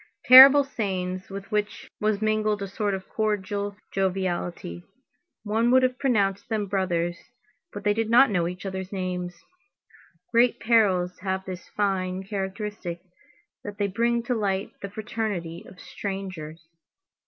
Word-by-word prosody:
Terrible 270 +3 +10
sayings 185 -7 -4
with 195 0 -8
which 210 0 -2
was 215 0 0
mingled 215 -1 0
a - - -4
sort 200 0 -2
of 190 - -8
cordial 205 -1 -2
joviality. 180 - -2 0.6
One 225 +2 +1
would 260 +1 +5
have 255 0 0
pronounced 205 -5 0
them 215 -2 -1
brothers, 175 -3 -1 0.5
but 205 - -8
they 210 - +3
did 225 +1 -1
not 240 +1 +6
know 175 -4 +1
each 180 +2 -7
other's 190 -1 -5
names. 180 -2 -4 0.9
Great 235 +1 +3
perils 195 -6 +2
have 190 0 -3
this 185 -2 -8
fine 190 -2 -1
characteristic, 195 -2 -5 0.6
that 205 0 -7
they 205 - 0
bring 235 +4 0
to 245 - -1
light 200 -3 -1
the 200 - -5
fraternity 205 -6 -4
of 180 - -15
strangers. 185 -6 -7
200 Hz, 140 wpm, -25 LUFS, 185-215 Hz, 0.9 s, Terrible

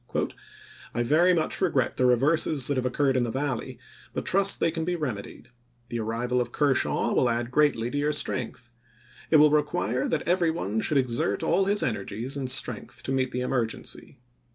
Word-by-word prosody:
" - - -19
I 120 - +1
very 160 +9 +4
much 165 0 0
regret 150 -9 +1
the 130 - +3
reverses 140 +2 +2
that 145 - 0
have 130 -1 0
occurred 135 +1 +1
in 125 - +2
the 120 - -2
Valley, 130 0 -3 0.4
but - - -3
trust 195 +1 +2
they 165 - +2
can 165 -1 -3
be 175 +2 -1
rem 145 -10 -2
edied. 100 - -11 0.4
The 120 - -3
arrival 120 +3 -1
of 120 -1 -4
Kershaw 145 -1 +1
will 125 - +3
add 120 +1 -2
greatly 125 -5 +2
to 145 - -3
your 150 +1 +1
strength... 120 -3 -3 0.6
It - - +3
will 150 0 +7
require 130 -5 0
that 160 - -2
every 175 -1 +2
one 110 - -2
should 150 - +1
exert 125 -3 0
all 190 +3 +2
his 205 +1 +2
energies 110 +4 -3
and 135 -2 -3
strength 130 +1 -1
to - - -4
meet 130 -1 +1
the 125 0 -3
emergency. 125 -3 -2
130 Hz, 195 wpm, -26 LUFS, 120-150 Hz, 0.6 s, will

